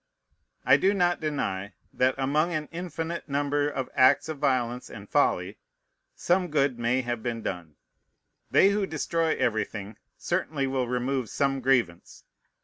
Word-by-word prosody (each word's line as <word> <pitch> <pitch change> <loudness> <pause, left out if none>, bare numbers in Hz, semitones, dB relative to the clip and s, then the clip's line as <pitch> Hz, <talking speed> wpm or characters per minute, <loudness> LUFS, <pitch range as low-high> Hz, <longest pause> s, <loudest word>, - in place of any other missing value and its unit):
I - - +6
do 195 +2 +2
not 175 -2 +2
deny, 105 -10 -3 0.2
that, 130 +1 +2
among 150 +6 +1
an 150 -1 -3
infinite 170 -1 -5
number 145 +1 0
of 135 -3 -3
acts 130 +4 +4
of 155 -3 -5
violence 125 -3 0
and 100 -1 -10
folly, - - +1 0.6
some 180 +1 +1
good 140 -5 +1
may 120 +2 +1
have 120 -2 -3
been 115 -1 -4
done. 85 -5 -5 0.7
They 195 - +5
who 200 -1 0
destroy 165 0 0
everything 110 -2 -2 0.2
certainly 140 -3 -1
will 130 -2 -1
remove 125 -1 -1
some 135 -1 0
grievance. 120 -10 0
135 Hz, 140 wpm, -27 LUFS, 120-155 Hz, 0.7 s, I